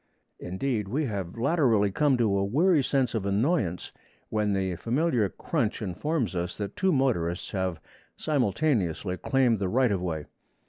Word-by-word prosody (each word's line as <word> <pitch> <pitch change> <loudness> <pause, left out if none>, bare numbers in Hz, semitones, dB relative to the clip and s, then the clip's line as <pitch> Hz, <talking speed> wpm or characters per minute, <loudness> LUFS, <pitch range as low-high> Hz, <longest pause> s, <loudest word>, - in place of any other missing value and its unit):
Indeed, 105 +3 -2
we 145 +9 -1
have 100 -5 -4
latterly 115 - +2
come 145 +4 +2
to 110 -5 +2
a - - +1
weary 150 - +3
sense 130 -2 0
of 110 -4 -1
annoyance 100 - 0 0.4
when 105 -2 0
the 95 -2 -1
familiar 120 - +1
crunch - - -2
informs 120 - -2
us 85 0 -3
that 100 -2 -5
two 190 0 +2
motorists 110 - 0
have 95 -4 -2 0.4
simultaneously 110 - 0
claimed 125 -3 +2
the 95 -2 -1
right 125 +2 +3
of 95 -3 0
way. 80 -4 -3
110 Hz, 150 wpm, -27 LUFS, 95-135 Hz, 0.4 s, weary